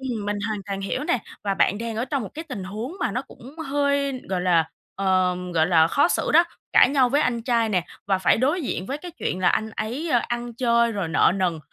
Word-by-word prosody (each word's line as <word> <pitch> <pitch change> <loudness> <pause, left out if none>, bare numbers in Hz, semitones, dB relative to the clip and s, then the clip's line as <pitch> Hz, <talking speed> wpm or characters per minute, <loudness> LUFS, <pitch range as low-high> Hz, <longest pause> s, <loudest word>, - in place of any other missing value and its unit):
Ừm, 240 -6 -4
mình 205 0 -1
hoàn 215 - -2
toàn 195 -1 -4
hiểu 255 +8 -3
nè 250 - +1 0.3
và 195 -1 0
bạn 200 - +2
đang 230 -1 -4
ở 230 - 0
trong 270 0 -2
một 205 - -6
cái 320 +2 -6
tình 210 -8 -5
huống 220 - -6
mà 245 - 0
nó 250 - -2
cũng 275 +2 -14
hơi 280 -1 0
gọi 185 -1 -1
là, 170 -3 +2 0.3
ờ, 185 -2 +2 0.2
gọi 160 0 +3
là, 165 -3 +5
khó 285 - +3
xử - - 0
đó, 335 +3 +7 0.3
cãi - - +7
nhau 270 -3 +3
với 285 +4 +2
anh 235 -2 0
trai 230 -2 +1
nè 180 -5 0 0.2
và 195 -2 +2
phải 185 - +3
đối 295 +8 +1
diện 190 -7 -3
với 280 +2 -3
cái 355 +2 -8
chuyện 250 - -3
là 180 - +4
anh 220 +4 0
ấy 235 +10 -4 0.2
ăn 240 -1 -4
chơi 235 -1 +2
rồi 200 -5 -2
nợ 160 +1 +4
nần 180 -4 0
230 Hz, 245 wpm, -24 LUFS, 190-265 Hz, 0.3 s, đó